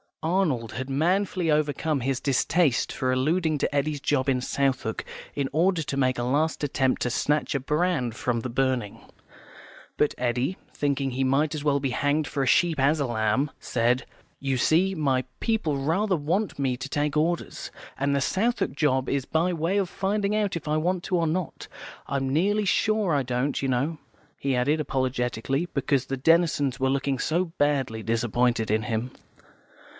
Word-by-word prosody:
Arnold 160 - 0
had 130 +2 -5
manfully 175 +4 +1
overcome 150 0 +1
his 130 +1 -1
distaste 140 +2 +1
for 130 -2 -1
alluding 155 +5 +1
to 145 - -1
Eddy's 145 +1 0
job 135 -1 +1
in 130 -1 +1
Southwark, 130 -4 -1 0.3
in 140 -2 0
order 175 +3 +2
to 140 - -4
make 130 -2 +2
a 120 - -1
last 150 +6 0
attempt 135 -2 +1
to 125 - 0
snatch 150 +6 0
a - - +2
brand 150 -4 0
from 120 0 -1
the 125 - -4
burning. 130 -4 -1 1.0
But 150 - +2
Eddy, 125 +8 0 0.2
thinking 140 -2 -1
he 130 +2 -1
might 145 +4 +1
as 150 - -4
well 145 -1 +2
be 135 -2 -1
hanged 145 +3 +1
for 140 - -2
a 135 - 0
sheep 165 +2 +3
as 145 +4 +3
a 140 - +1
lamb, 120 +4 0
said, 120 +1 0 0.3
"You 135 -1 -1
see, 175 +9 +3
my 135 -5 +1 0.2
people 195 -11 0
rather 185 +8 +1
want 175 +7 -1
me 130 -3 0
to 130 +2 -6
take 145 +1 0
Orders, 170 +3 -1 0.3
and 140 +1 +1
the 140 - +1
Southwark 225 - 0
job 130 -3 +1
is 135 -2 0
by 170 +3 +1
way 170 +4 0
of 195 -3 0
finding 200 +2 -1
out 210 -3 0
if 165 -2 -5
I 150 +1 +1
want 175 +3 0
to 185 - 0
or 165 -1 +1
not. 175 +2 -3 0.4
I'm 135 -1 -1
nearly 205 +8 +2
sure 210 -2 +2
I 140 - +2
don't, 125 +3 -1
you 135 - -1
know," 135 +6 0 0.4
he 135 -1 -1
added, 145 +6 +1
apologetically, 130 +1 -1
because 135 -1 0
the 135 - -2
Denisons 150 -2 +2
were 130 0 +2
looking 135 0 0
so 170 +7 +1
badly 135 -6 +1
disappointed 115 0 +1
in 110 0 +1
him. 115 +3 -2
140 Hz, 180 wpm, -26 LUFS, 130-165 Hz, 1.0 s, sheep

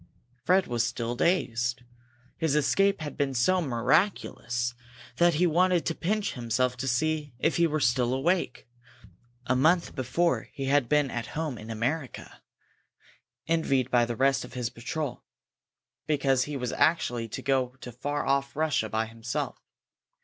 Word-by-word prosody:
Fred 185 +1 +4
was 120 -1 0
still 120 0 -2
dazed. 125 -6 0 0.6
His 160 -3 +1
escape 195 +6 +2
had 150 -2 -5
been 135 -2 -1
so 185 +10 +3
miraculous 120 - 0 0.4
that 175 -2 +4
he 175 +4 +3
wanted 175 +1 +3
to 165 - 0
pinch 205 +5 -1
himself 125 +1 0
to 135 - -3
see 145 +2 -1
if 160 +6 +1
he 170 0 +4
were 155 0 -1
still 125 -2 +2
awake. 170 +3 0 0.8
A 130 - +1
month 160 +7 +3
before 150 +7 0
he 135 - -4
had 135 -3 +2
been 150 -2 +2
at 120 -1 -4
home 155 -5 -2
in 110 - -10
America, 125 +6 -4 1.0
envied 135 -6 +1
by 120 -1 +4
the 120 0 -4
rest 135 +2 +2
of - - -11
his 125 -2 -3
patrol 130 +2 -4 0.8
because 135 -4 +2
he 145 -1 -4
was 125 -2 -3
actually 120 -8 +1
to - - -7
go 130 -2 0
to 125 - -7
far 145 +5 -3
off 140 0 0
Russia 150 -8 0
by 110 +1 0
himself. 115 +1 -4
135 Hz, 155 wpm, -28 LUFS, 120-160 Hz, 1.0 s, Fred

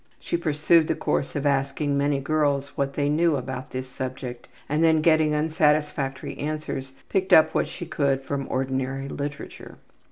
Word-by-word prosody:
She - - -3
pursued 160 0 +3
the - - 0
course 135 - -1
of 145 0 -2
asking 140 +1 +1
many 140 0 +1
girls 140 -1 0
what 140 -1 -3
they 145 -1 +1
knew 160 +2 +3
about 130 -1 -5
this 130 0 -5
subject 130 -1 -6 0.2
and 150 +3 +1
then, 160 -1 +4
getting 155 -2 +4
unsatisfactory 150 -3 0
answers, 150 -3 -4
picked 190 -1 -1
up 160 - +7
what - - +1
she 175 - -7
could 140 -4 0
from 140 0 -3
ordinary 130 +1 -2
literature. 145 +1 -7
145 Hz, 160 wpm, -25 LUFS, 135-155 Hz, 0.2 s, up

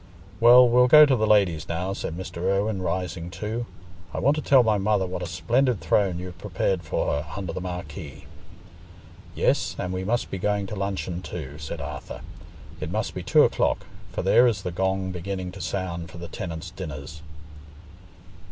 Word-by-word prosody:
"Well, 125 +2 +8
we'll 125 +1 +5
go 150 +3 +9
to 140 -3 +3
the 110 -2 +1
ladies 95 -7 +3
now," 90 +3 -2
said 85 -3 -5
Mr. 95 -2 -7
Irwine, 100 +3 0
rising 90 -1 -3
too. 110 +6 -4 0.5
"I - - -1
want 140 +4 +3
to 155 - -2
tell 135 -4 +5
my 110 -3 +2
mother 100 -1 +1
what 90 0 -5
a 90 - -3
splendid 120 +6 +1
throne 90 +2 +1
you've 90 0 -8
prepared 95 -2 -1
for 75 - -2
her 75 +2 -3
under 95 -4 -4
the 95 - -4
marquee." 85 -5 -7 1.1
"Yes, - - +1
and 90 0 -3
we 95 0 -3
must 115 +5 -1
be 95 - -3
going 105 +1 0
to 100 - -6
luncheon 95 -3 -3
too," 75 -5 -7
said 75 -2 -6
Arthur. - - -7 0.6
"It - - -4
must - - -2
be - - -5
two - - +5
o'clock, - - +1 0.3
for 90 - -3
there 120 +6 +5
is 105 -5 -1
the 90 - -3
gong 95 +1 -1
beginning 90 +1 -4
to 100 +1 -9
sound 85 -3 -3
for - - -11
the 85 0 -7
tenants' 80 0 -6
dinners." 75 -3 -7
95 Hz, 185 wpm, -25 LUFS, 85-105 Hz, 1.1 s, go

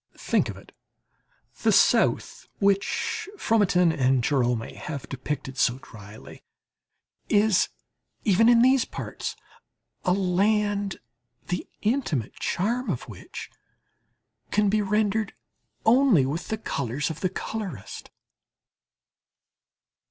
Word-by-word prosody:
Think - - +1
of - - -6
it, - - -15 0.9
the - - +3
South - - +3
which 200 - 0
Fromentin 185 - +3
and 130 -4 +2
Gérome 120 -4 0
have 140 -3 -6
depicted 135 0 -5
so 125 - +3
dryly, 105 -3 -13 0.9
is 210 -1 +3 0.5
even 225 +2 +4
in 235 -1 +6
these 260 -1 +5
parts - - -6 0.7
a 180 - +2
land 200 +1 +1 0.5
the 180 - -2 0.2
intimate 210 - 0
charm 235 +7 -1
of - - -2
which - - -9 1.0
can 210 -1 +2
be 215 +1 +2
rendered 210 +1 0 0.5
only 235 - +5
with 150 +6 -3
the 220 - -2
colours 140 - -2
of 160 - -8
the 185 - 0
colourist. 190 - -6
195 Hz, 105 wpm, -26 LUFS, 140-215 Hz, 1.0 s, in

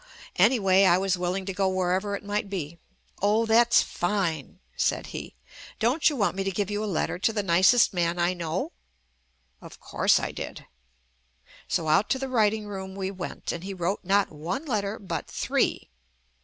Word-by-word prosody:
5 - - -24
' - - -18
Anyway, 195 -5 +3
I 175 -1 +5
was 190 0 +1
willing 180 +2 -2
to 195 - -3
go 190 +1 +1
wherever 185 +2 0
it 200 - -7
might 205 0 -2
be. 170 -4 -5 0.4
"Oh 210 +3 +3
that's 235 +1 +5
fine," 175 -6 -2 0.2
said - - 0
he. - - -7 0.4
"Don't 250 +10 +3
you 300 - -4
want 205 -7 0
me 195 - -1
to 195 - -1
give 200 +1 -2
you 205 +1 -2
a 215 - -2
letter 180 0 -1
to 225 - +2
the 210 -2 -2
nicest 190 +7 +4
man 175 -1 0
I 175 +1 +1
know?" 170 0 -3 0.9
Of - - -12
course - - +2
I - - -3
did. - - -7 1.0
So 160 - -1
out 155 +7 +3
to 265 - +2
the 265 0 -4
writing 220 -3 +1
room 190 -2 -7
we 195 -1 -3
went, 185 -3 -5
and 170 - -6
he 195 0 -5
wrote 185 +3 -1
not 200 +2 +2
one 170 - -4
letter 210 -5 -2
but 195 - -5
three. - - -1
195 Hz, 190 wpm, -26 LUFS, 180-210 Hz, 1.0 s, I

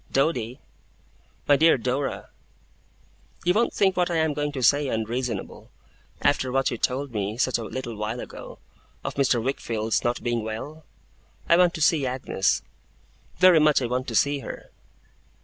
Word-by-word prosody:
'Doady!' 130 -3 0 0.9
'My 145 - +5
dear 160 0 +5
Dora!' 130 +3 -3 1.1
'You 180 - +4
won't 230 +4 +2
think 190 -2 +2
what 180 -1 +1
I 170 - -1
am 160 -1 +1
going 145 0 -2
to 130 -3 -4
say, 145 +3 +4
unreasonable, 115 -2 -3 0.5
after 135 -3 +2
what 135 0 +1
you 120 - -3
told 135 +2 -1
me, 105 0 -3
such 130 -1 +1
a - - -4
little 120 -1 -5
while 105 +3 -4
ago, - - -9 0.5
of - - -4
Mr. 135 -3 +2
Wickfield's 115 -4 -1
not 120 0 -1
being 120 -1 0
well? 145 +8 -7 0.6
I 170 - +6
want 175 -1 +4
to 160 - -5
see 155 -5 +3
Agnes. 125 -6 0 0.7
Very 185 -2 +6
much 150 -1 +4
I 130 - -2
want 125 +2 -2
to 115 - -4
see 140 +4 +2
her. - - -9
130 Hz, 165 wpm, -25 LUFS, 120-150 Hz, 1.1 s, I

